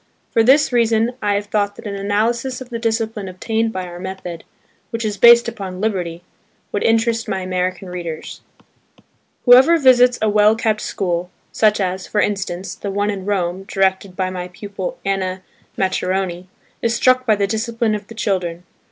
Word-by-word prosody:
For 225 - +3
this 270 +6 +4
reason 230 -1 +2
I 205 -1 +1
have 205 0 -1
thought 205 -1 -1
that - - -12
an 205 - -4
analysis 225 +6 -1
of 260 -2 -10
the 235 -2 -4
discipline 225 -3 -2
obtained 220 +5 -1
by 185 -3 -4
our 175 0 -9
method–which 190 +4 -8
is 210 -1 -1
based 235 +3 +7
upon 195 -5 -6
liberty,–would 190 +1 -5
interest 225 0 +1
my 190 -1 -2
American 185 +1 -2
readers. 175 -3 -6 1.0
Whoever 260 +7 +7
visits 250 -3 +5
a 220 - +1
well 210 +1 +4
kept 220 -1 0
school 175 -2 -2 0.2
(such 210 -1 +2
as, 185 -1 -2
for 210 - -1
instance, 195 -3 -2
the 200 - -6
one 205 +1 0
in 195 -2 -6
Rome 185 -2 -1
directed 190 -1 0
by 185 -1 -1
my 180 -1 -5
pupil 200 - -6
Anna 190 -1 -2 0.3
Maccheroni) 185 -1 -1 0.3
is 230 0 +1
struck 255 +1 +3
by 215 - +5
the 200 -1 +1
discipline 225 +2 -1
of 210 -1 -4
the 225 - -11
children. 180 -5 -2
205 Hz, 165 wpm, -19 LUFS, 185-225 Hz, 1.0 s, based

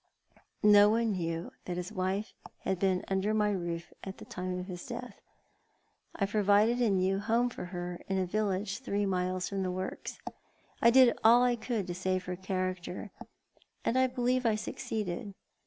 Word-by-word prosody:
No 205 0 +8
one 225 +1 +2
knew 165 -2 -3
that 175 -1 -3
his 180 +3 -4
wife 195 +2 -2 0.3
had 190 - -1
been 185 -1 +1
under 195 +3 0
my 210 -1 +2
roof 170 -3 -4
at 195 0 -7
the - - -10
time 180 0 -4
of 180 - -4
his 180 -2 -7
death. 245 0 -7 0.9
I 200 - +1
provided 210 +3 +3
a 235 - +4
new 190 0 +2
home 230 +4 +1
for 180 - -6
her 175 -1 -5
in 195 - 0
a 190 - +1
village 200 +1 -1
three 205 -6 -1
miles 185 -1 -1
from 195 -1 -3
the 185 - -1
works. 185 +1 -5 0.6
I 235 - +7
did 250 0 +6
all 235 +2 +7
I 245 -1 +3
could 225 -3 -2
to 175 - -4
save 185 0 -1
her 180 - -3
character, 185 +1 -3 0.7
and 230 - +1
I 260 0 +4
believe 250 0 0
I 225 -3 +3
succeeded. 210 -1 -4
195 Hz, 175 wpm, -31 LUFS, 185-220 Hz, 0.9 s, No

